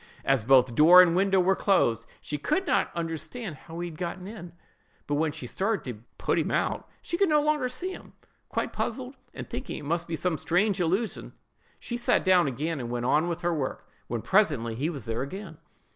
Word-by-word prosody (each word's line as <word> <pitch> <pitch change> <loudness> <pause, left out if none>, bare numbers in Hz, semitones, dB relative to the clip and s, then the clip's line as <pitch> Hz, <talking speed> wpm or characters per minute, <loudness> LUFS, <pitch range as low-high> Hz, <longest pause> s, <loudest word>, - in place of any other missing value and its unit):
As 135 -5 +2
both 130 0 +5
door 165 +8 +8
and 170 -1 +2
window 195 +1 +3
were 190 +1 +3
closed, 115 - +2
she 150 0 -4
could 310 - 0
not - - +2
understand 170 +4 -4
how 165 +4 -10
he 175 - -3
had 155 - -12
got 175 0 -3
in; 185 -2 -9 0.5
but 145 - -3
when 155 +1 +1
she 135 - -8
started 200 - -1
up - - -21 0.2
to 115 - -26 0.2
put - - +2
him - - -1
out, - - -1
she 340 - -3
could 395 -3 +4
no 300 -1 +4
longer 295 -3 +1
see 345 +10 -4
him. - - -11 0.4
Quite - - -2
puzzled, 250 +3 -3 0.2
and - - -8
thinking 255 +2 -5
it 150 - -8
must 170 +3 -1
be 165 - -2
some 165 -1 -1
strange 190 +3 +1
illusion, 190 +7 -1 0.5
she 240 - -4
sat 240 - +2
down 185 -4 +5
again 145 +4 -2
and 120 -2 -5
went 120 0 -2
on 150 +6 +3
with 175 0 -3
her 175 0 0
work, 140 -5 -4 0.2
when, 120 -2 -3
presently, 145 - +2
he 140 +8 -1
was 140 -10 -6
there 115 +1 -2
again. 165 +3 -7
170 Hz, 215 wpm, -27 LUFS, 145-205 Hz, 0.5 s, door